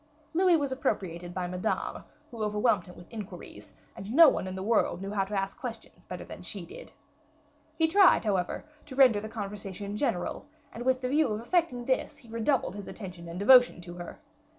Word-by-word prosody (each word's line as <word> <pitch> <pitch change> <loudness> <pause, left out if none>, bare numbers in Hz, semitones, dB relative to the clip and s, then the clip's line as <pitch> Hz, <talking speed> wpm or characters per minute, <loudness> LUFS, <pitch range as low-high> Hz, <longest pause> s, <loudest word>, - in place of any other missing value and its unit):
Louis 360 0 +4
was 285 -3 -2
appropriated 175 -9 -2
by 180 0 -3
Madame, 180 +1 -3 0.3
who 230 -2 -7
overwhelmed 210 -2 +1
him 180 - -12
with 175 - -12
inquiries, 215 -2 -9 0.2
and 195 +3 -7
no 315 +4 +9
one 190 - -2
in 185 - -5
the 190 - -4
world 215 -4 +2
knew 195 +1 -5
how 195 -2 0
to 200 0 -1
ask 195 0 -4
questions 230 -3 -8
better - - -7
than - - -10
she - - -6
did. - - -11 0.9
He 320 0 +4
tried, 375 - +5
however, 190 +1 -1 0.2
to 265 - -8
render 250 -6 +6
the 215 - -6
conversation 205 -2 -6
general, 210 -4 -2 0.3
and, 240 +2 -6
with 260 0 +2
the 250 - -1
view 300 +2 +3
of 215 -2 -2
effecting 250 -3 0
this, 260 0 -1
he 235 - -18
redoubled 230 -1 0
his 205 -1 -7
attention 180 -5 -8
and 170 - -6
devotion 245 +2 +6
to 175 0 -9
her. 175 -1 -9
215 Hz, 195 wpm, -29 LUFS, 190-260 Hz, 0.9 s, no